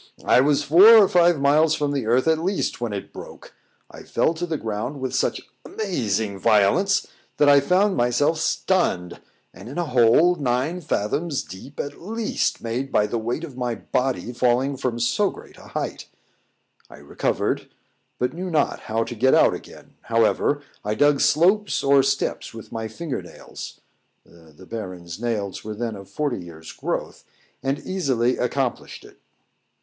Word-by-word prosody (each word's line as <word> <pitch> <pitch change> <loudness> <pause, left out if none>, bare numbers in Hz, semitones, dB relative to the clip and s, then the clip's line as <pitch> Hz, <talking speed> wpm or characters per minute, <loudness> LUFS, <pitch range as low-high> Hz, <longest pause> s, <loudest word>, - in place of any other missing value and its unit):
I - - +5
was 145 +1 +2
four 185 +10 +8
or 205 -3 +7
five 175 -3 +3
miles 150 +3 +3
from 145 -2 -1
the 135 -6 -2
earth 125 +5 +2
at 160 -1 +3
least 185 -6 -2
when 120 -2 -2
it 100 -1 -6
broke; - - -11 0.4
I - - -11
fell 160 - 0
to 175 +2 -4
the 160 -2 -2
ground 110 +5 -4
with 130 -1 -4
such - - 0 0.2
amazing 110 - -2
violence, 115 - +3 0.3
that 145 - +4
I 140 0 +7
found 185 +7 +2
myself 125 +7 +1
stunned, 160 - 0 0.3
and - - -11
in 140 - -8
a 175 - 0
hole 130 +6 +4
nine 145 +3 -1
fathoms 145 +3 -2
deep 130 +10 -12
at 145 - -5
least, 220 +4 -2
made 125 +4 -3
by 105 - +3
the 115 +2 -2
weight 120 +8 -3
of 150 -6 -8
my 125 -2 -2
body 125 -1 -2
falling 125 +3 +1
from 125 -3 -3
so 190 - +1
great - - -13
a - - -15
height: - - -5 0.8
I - - -13
recovered, - - -2 0.5
but 125 +2 -1
knew 185 +2 -5
not 155 -4 0
how 115 +1 -2
to 120 - -6
get 130 +4 +3
out - - +5
again; - - -11
however, 115 +5 +1 0.2
I 105 +1 -2
dug 145 +2 +3
slopes 195 +7 +2
or 140 0 +5
steps 135 -3 -2
with 115 - -10
my 110 -1 -4
finger 140 +4 -5
nails - - -11 0.4
[the 80 +1 -18
Baron's 90 -4 -7
nails 105 -5 -3
were 110 0 -6
then 115 0 -3
of 100 -1 -11
forty 125 -2 -2
years' 80 -2 -11
growth], - - -4 0.4
and 135 +1 -1
easily 130 -9 -1
accomplished 125 0 -3
it. - - -17
130 Hz, 165 wpm, -23 LUFS, 115-160 Hz, 0.8 s, four